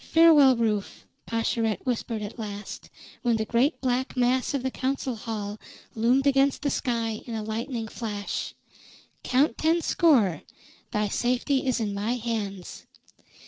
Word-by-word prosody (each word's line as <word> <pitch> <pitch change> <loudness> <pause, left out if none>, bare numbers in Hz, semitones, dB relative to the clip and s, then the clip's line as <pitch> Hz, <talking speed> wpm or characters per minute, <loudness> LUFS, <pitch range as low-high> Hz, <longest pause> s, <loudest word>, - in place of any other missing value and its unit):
"Farewell, 310 -5 +6
Rufe," 215 -3 -1 0.2
Pascherette 225 -1 -1
whispered 230 -3 -2
at 210 +3 -7
last, 205 -1 -7 0.3
when 240 -2 +2
the 220 0 -1
great 245 +8 +1
black 255 0 -1
mass 250 +3 +2
of 265 - -2
the 260 - -1
council 260 -1 -2
hall 210 -2 -5 0.3
loomed 245 +5 +2
against 275 0 +3
the 285 - +1
sky 230 -4 -1
in 230 - -4
a 220 - -3
lightning 225 +2 -3
flash. 210 -3 -4 0.7
"Count 270 +5 +2
ten 325 +2 +3
score. 230 - +3 0.5
Thy 210 0 0
safety 255 +5 0
is 250 -2 +1
in 210 -3 -2
my 210 +5 -1
hands." 215 -6 -5
235 Hz, 145 wpm, -26 LUFS, 215-260 Hz, 0.7 s, Farewell